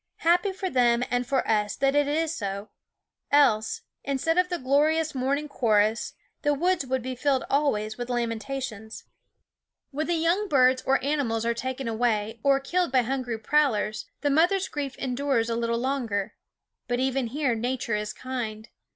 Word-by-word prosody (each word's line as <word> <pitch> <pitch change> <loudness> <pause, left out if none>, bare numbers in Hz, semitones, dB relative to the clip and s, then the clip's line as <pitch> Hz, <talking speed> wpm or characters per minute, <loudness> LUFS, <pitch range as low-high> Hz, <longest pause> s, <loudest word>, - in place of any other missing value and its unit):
Happy 350 +4 +3
for 380 0 -4
them 245 -6 +3
and 245 0 0
for 270 -1 0
us 210 -2 +1
that 275 0 +1
it 290 0 +3
is 315 +2 0
so; 200 -5 -4 0.6
else, 240 -7 +3 0.2
instead 280 +4 0
of 360 0 +2
the 350 - -1
glorious 305 +4 +2
morning 275 +3 -1
chorus, 220 -4 +1 0.3
the 290 -1 +2
woods 355 +2 +1
would 260 -1 -1
be 260 +1 -3
filled 265 +1 +1
always 220 -7 0
with 245 0 -4
lamentations. 235 -1 -4 0.9
When 305 +3 -2
the 345 - +1
young 340 +6 +1
birds 255 -3 +4
or 270 0 +2
animals 260 -6 0
are 235 - +2
taken 260 +2 -4
away, 225 -1 0
or 275 +1 +3
killed 350 +4 0
by 255 -2 +3
hungry 250 -2 -2
prowlers, 220 -4 +1
the 290 - +1
mother's 365 +6 +3
grief 280 -3 -4
endures 255 -3 0
a - - 0
little 235 0 0
longer. 235 -6 -2 0.5
But 245 0 -1
even 265 -1 0
here 270 +1 0
Nature 235 +1 -2
is 210 0 -1
kind. 225 -3 -5
260 Hz, 165 wpm, -26 LUFS, 230-290 Hz, 0.9 s, birds